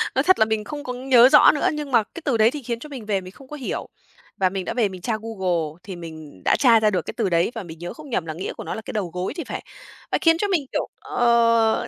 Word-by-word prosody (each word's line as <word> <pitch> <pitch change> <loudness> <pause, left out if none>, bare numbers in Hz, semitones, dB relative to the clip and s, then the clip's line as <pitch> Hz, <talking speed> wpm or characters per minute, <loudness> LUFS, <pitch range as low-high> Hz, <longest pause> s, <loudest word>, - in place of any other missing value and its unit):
nói 265 - +3
thật 375 +3 +4
là 220 - +6
mình 220 -1 -1
không 290 +6 -7
có 250 - -4
nhớ 250 -1 +5
rõ - - +8
nữa, 290 - +1
nhưng 300 -2 -5
mà 235 -3 +4
cái 335 - -11
từ 265 -6 +1
đấy 220 +1 +5
thì 295 - -6
khiến 235 -1 -3
cho 300 - -10
mình 260 -6 -8
về 200 -2 0
mình 185 0 -10
không 270 +6 -16
có 300 - -8
hiểu. 270 -4 -4 0.5
Và 190 -1 +2
mình 190 -1 -4
đã - - -3
về 230 -5 +1
mình 185 -2 -9
tra 220 +4 -1
Google, 180 -8 -2
thì 190 - -7
mình 160 - -10
đã - - +4
tra 235 -4 +6
ra 215 -1 +3
được 185 -4 0
cái - - -5
từ 220 -5 +1
đấy 170 +4 +2
và 225 - -4
mình 165 -2 -11
nhớ 175 +1 -6
không 300 +4 -12
nhầm 185 -9 -1
là 160 - -4
nghĩa 175 +4 -5
của - - -8
nó - - -4
là 220 - -6
cái - - -7
đầu 200 -5 -2
gối 180 +1 -3
thì 335 - -3
phải. - - -6 0.5
Ờ, - - +1
khiến 330 -1 +5
cho 410 - 0
mình, 350 -8 0
kiểu, - - -1
ờ, 230 -2 +2
225 Hz, 305 wpm, -23 LUFS, 185-260 Hz, 0.5 s, rõ